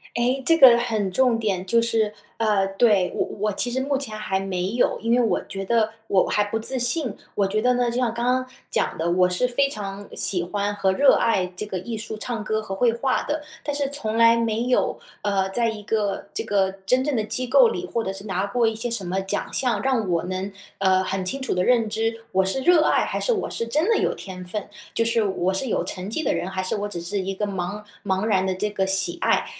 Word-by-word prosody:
哎， 250 +3 +1
这 330 +3 +5
个 255 -6 +9
很 215 -5 -1
重 245 +2 +3
点。 200 -5 -1
就 230 +5 +3
是 220 -2 +1 0.2
呃， 210 -3 +2
对， 195 -1 +2
我 - - 0
我 210 +1 +1
其 245 - -1
实 255 +2 -1
目 280 +1 0
前 220 -6 -5
还 190 -3 -1
没 190 -1 -2
有， 240 +2 +1
因 230 +1 -1
为 250 - +3
我 220 -6 +1
觉 195 0 -5
得 220 +2 +1 0.2
我 190 -2 +3
还 210 - +2
不 205 +2 -2
自 250 +4 +3
信， 245 -2 -1 0.2
我 200 - +2
觉 215 +2 0
得 250 +1 +3
呢， 245 -1 +1
就 240 - -3
像 245 -3 +1
刚 235 +1 -2
刚 255 +1 +1 0.3
讲 - - 0
的， 170 +2 0
我 180 0 +3
是 180 +8 +1
非 275 +3 +1
常 200 -4 -6
喜 180 -3 0
欢 205 +3 -2
和 195 -2 +1
热 275 +5 +5
爱 195 -5 +2
这 - - -4
个 190 - -3
艺 225 +6 -5
术 220 0 -6
唱 225 -1 -4
歌 215 0 -1
和 195 -3 -6
绘 235 +4 +3
画 255 +3 0
的， 300 0 -3 0.2
但 290 -1 -2
是 285 -1 0
从 225 -6 -1
来 230 0 +6
没 230 0 0
有， 250 0 +1 0.2
呃， 195 -2 +1
在 230 +3 +1
一 215 -2 -6
个 205 -2 -1
这 - - -2
个 195 -3 +1 0.2
真 255 +3 +3
正 295 0 -1
的 220 - +1
机 255 +4 -3
构 480 - +6
里， 370 -5 -3
或 230 -9 -2
者 190 - -2
是 195 +1 -8
拿 190 -1 -1
过 240 +3 +1
一 225 - +2
些 225 +2 -4
什 230 -4 -3
么 190 +2 -1
奖 195 - -3
项， 250 -3 +1
让 250 -7 +1
我 170 -2 +1
能， 185 +2 -4 0.3
呃， 190 -1 +3
很 190 0 -2
清 270 +9 -2
楚 265 - -1
地 180 - +1
认 230 0 +3
知 225 +1 -2
我 190 0 +3
是 195 +8 -1
热 345 +1 +5
爱 - - +3
还 - - -3
是 - - +1
我 420 - -2
是 230 - -4
真 305 - +1
的 455 - +3
有 - - 0
天 185 -2 -8
分， 200 +3 -4 0.3
就 230 - +2
是 230 -1 +2
我 190 -2 0
是 220 +8 -1
有 - - 0
成 185 +1 -5
绩 315 +9 -2
的 - - +1
人 185 - -2
还 185 0 -3
是 185 - -2
我 205 0 -2
只 175 -4 -6
是 195 +4 -3
一 195 0 -3
个 210 - -1
茫 200 +1 -4 0.2
茫 190 0 0
然 195 -4 +2
的 190 -1 -1
这 210 +3 -1
个 190 -2 -1
喜 190 -2 +1
爱。 - - +2
215 Hz, 270 characters per minute, -23 LUFS, 195-240 Hz, 0.3 s, 个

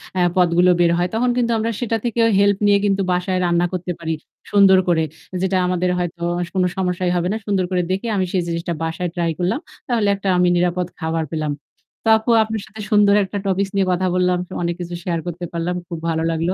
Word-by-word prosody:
অ্যা 185 - +1 0.2
পদগুলো 180 0 +4
বের 170 -1 +4
হয়। 175 +1 +1
তখন 245 +2 +1
কিন্তু 235 -1 +1
আমরা 225 +1 -1
সেটা 230 -2 0
থেকেও 230 -1 +2
হেল্প 200 -1 +4
নিয়ে 200 0 +5
কিন্তু 195 -1 +1
বাসায় 180 +1 0
রান্না 175 0 +2
করতে 180 0 -3
পারি 160 -1 -2 0.4
সুন্দর 195 -2 +6
করে। 160 -2 +3 0.4
যেটা 190 0 +1
আমাদের 180 0 0
হয়তো 175 -1 -4 0.3
কোন 185 -1 +1
সমস্যাই 180 -1 0
হবে 175 0 0
না। 220 - -1
সুন্দর 195 -3 +1
করে 180 -1 +2
দেখে 195 +5 -2
আমি 190 - +1
সেই 185 -2 +1
জিনিসটা 170 0 -2
বাসায় 165 +2 -2
ট্রাই 170 -1 0
করলাম। 180 +10 0 0.3
তাহলে 230 -4 +1
একটা 195 0 -6
আমি 180 - +3
নিরাপদ 180 0 0
খাবার 160 -1 -1
পেলাম। 155 -2 -2 0.5
তো - - -4
আপু 220 +2 -5
আপনার 220 -1 -4
সাথে 220 0 -10
সুন্দর 205 -1 +5
একটা 195 +2 -5
টপিকস 195 +1 0
নিয়ে 195 -1 +2
কথা 185 +1 +1
বললাম। 180 0 +2 0.3
অনেক 170 0 -1
কিছু 175 0 -5
শেয়ার 170 -2 -1
করতে 175 +1 -4
পারলাম। 170 +1 -2
খুব 170 - -6
ভালো 160 0 0
লাগলো। 165 +3 0
180 Hz, 210 wpm, -20 LUFS, 175-200 Hz, 0.5 s, সুন্দর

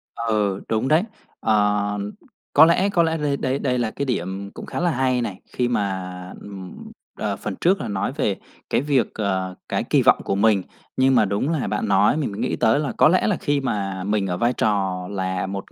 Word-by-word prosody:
Ừ, 105 -4 0
đúng 110 +4 0
đấy. 155 +5 +4 0.4
Ờ, 105 -1 +1 0.5
có 155 - +9
lẽ 180 +4 +3
có 175 -4 +3
lẽ 165 0 0
đây 145 -2 0
đây 130 +1 -1
đây 125 -2 0
là 115 -2 -1
cái 140 - -3
điểm 100 -5 -3
cũng - - -8
khá - - -4
là 175 0 +2
hay 130 -3 +1
này, 105 -5 -5
khi 125 - +1
mà, 95 -5 -3
ừm, 95 -3 -9 0.3
ờ, - - -1
phần - - -5
trước 190 +3 +3
là - - -3
nói 100 +4 -2
về 120 -9 0 0.3
cái - - +2
việc, 140 -3 +1
ờ, 95 -3 -2
cái - - 0
kỳ - - +2
vọng - - +5
của 95 - -1
mình, 100 -1 +3 0.4
nhưng 130 0 +4
mà 110 -3 +5
đúng 100 +9 -1
là 155 -9 -1
bạn 105 +2 -1
nói 100 +7 +4
mình 145 -9 -1
mới 100 - -7
nghĩ - - -1
tới 110 +5 +3
là 145 -4 -1
có - - +6
lẽ 185 +3 +3
là 205 - +2
khi 145 -2 0
mà 100 -7 -2
mình 100 0 0
ở 90 -1 -2
vai 120 +1 +2
trò 95 -5 0
là 95 -1 -2
một 100 0 -6
110 Hz, 220 wpm, -22 LUFS, 95-135 Hz, 0.5 s, có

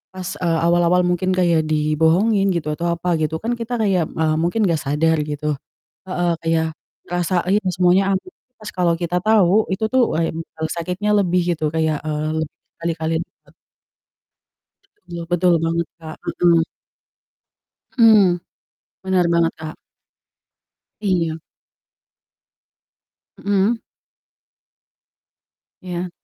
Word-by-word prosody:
pas, 185 0 -5
eee, 165 -2 +1
awal-awal 175 +1 +3
mungkin 180 +1 0
kayak 170 -3 +3
dibohongin 160 +7 +2
gitu 155 -3 -2
atau 170 +3 -2
apa 175 +1 -1
gitu 155 0 -1
kan, 225 +8 -3
kita 235 0 -4
kayak, 195 -7 +1
eee, 155 -1 0
mungkin 175 +7 +1
enggak 165 -4 +1
sadar 160 +3 +1
gitu. 150 0 -2 0.5
Heeh, 175 -2 0
kayak 165 0 +1 0.4
berasa, 175 +1 0
ini 205 +3 +2
semuanya 185 +2 +3
aman. 195 - -3 0.3
Pas 215 - -8
kalau 175 -2 +2
kita 175 +1 -1
tahu, 215 -1 +4
itu 210 +3 0
tuh 255 0 +2
wah, - - +1
mmm, 160 -1 -5
sakitnya 180 +6 -1
lebih 180 -3 +2 0.2
gitu, 155 -1 -1
kayak, 160 -2 0
eee, 155 0 -2
lebih 155 - -6 0.2
berkali-kali 165 -1 -2
lipat. - - -28 1.5
Betul 170 -1 -6
betul 175 0 +3
banget, 165 +1 0
Kak. 160 -1 -9
Heeh. 170 -2 +3 1.3
Hmm. 215 -6 +6 0.7
Bener 190 -1 +2
banget 170 -1 +2
Kak. 155 -1 -7 1.2
Iya. 170 -6 0 2.0
Mhm. 205 +3 +1 2.0
Iya. 180 0 -4
175 Hz, 120 wpm, -20 LUFS, 160-190 Hz, 2.0 s, Hmm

